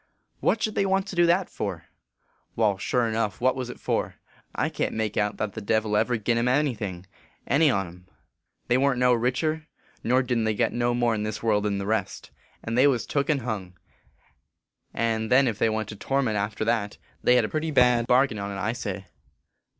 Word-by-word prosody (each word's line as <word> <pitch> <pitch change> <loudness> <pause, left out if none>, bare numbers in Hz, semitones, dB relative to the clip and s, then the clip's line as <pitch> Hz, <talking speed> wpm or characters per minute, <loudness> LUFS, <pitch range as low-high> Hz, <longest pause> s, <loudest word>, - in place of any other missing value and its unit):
" - - -48
What 225 - +1
should 215 - 0
they 195 - +1
want 195 0 +1
to - - -6
do 175 0 +4
that 180 +2 +2
for? 95 -6 -5 0.2
" - - -47
" - - -43
Wai, 110 -3 +2
sure 120 +4 +1
enough; 110 -3 -1
what 130 +2 +2
was 130 -2 -4
it - - -9
for? - - -2 0.4
I - - +1
can - - -2
t - - -8
make 110 -2 -2
out 105 -1 0
that 105 -3 -3
the 110 - -6
Devil 110 0 0
ever 120 +3 +2
gin 115 +2 0
em 120 - +1
any 140 +2 +2
thing, 95 -5 -6 0.4
any 145 +4 +4
on 100 -6 +1
em. 90 +1 -14 0.6
They 125 +1 +3
warn 140 -1 +2
t - - -2
no 125 0 +4
richer, 150 +7 -1 0.4
nor 130 +3 +3
didn 120 -3 0
t 110 -1 0
get - - +1
no 120 0 0
more 120 -1 +2
n 105 - -2
this 105 +1 -4
world 105 -2 +2
than 100 -1 0
the 100 - -3
rest; 105 -2 -2 0.3
and 115 - -3
they 130 +3 +5
was 125 -5 +1
took 140 -1 -1
and 145 -3 +2
hung; 100 -6 -5 1.1
and 110 -1 -1
then 130 +1 +5
ef 110 -3 -2
they 115 - +3
went 110 -1 -2
to 105 - -7
torment 130 0 -1
after 105 +1 -2
that, 110 -3 -1 0.2
they 125 - +4
hed 125 -3 +4
a - - -4
pretty 155 +1 -2
bad 125 -4 +3
bargain 125 -3 +3
on 100 0 -4
t, 100 - -5
I 105 +4 -1
say." 100 -5 -5
115 Hz, 230 wpm, -26 LUFS, 105-130 Hz, 1.1 s, they